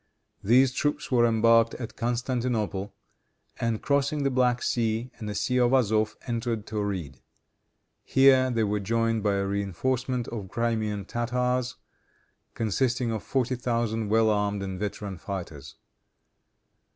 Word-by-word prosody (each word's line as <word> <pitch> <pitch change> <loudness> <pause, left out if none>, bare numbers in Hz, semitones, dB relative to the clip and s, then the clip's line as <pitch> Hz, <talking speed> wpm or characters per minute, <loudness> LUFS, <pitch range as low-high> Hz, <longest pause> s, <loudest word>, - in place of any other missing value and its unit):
These 125 +5 +5
troops 145 +3 -2
were 120 -2 +4
embarked 115 0 +4
at 120 -2 -7
Constantinople, 120 -4 -2 0.6
and, 115 -2 -1
crossing 140 +1 +1
the 135 - +1
Black 125 -1 +2
Sea 115 +1 -1
and 105 -3 -5
the 105 - -4
Sea 125 +5 0
of 120 +1 +3
Azof, 110 -4 +2
entered 115 -3 -2
Tauride. 95 - -4 0.8
Here 135 -1 +5
they 115 -3 +1
were 105 0 0
joined 115 +2 0
by 100 -1 +1
a 100 0 0
reinforcement 120 +6 -1
of 105 -5 -6
Crimean 110 -3 -1
Tartars, 125 +2 -1 0.8
consisting 120 +2 0
of 110 -2 -3
forty 130 -1 -1
thousand 115 -3 -1
well 110 0 +4
armed 105 -1 0
and 95 -1 -5
veteran 100 -2 -4
fighters. 75 -8 -7
115 Hz, 130 wpm, -27 LUFS, 105-125 Hz, 0.8 s, These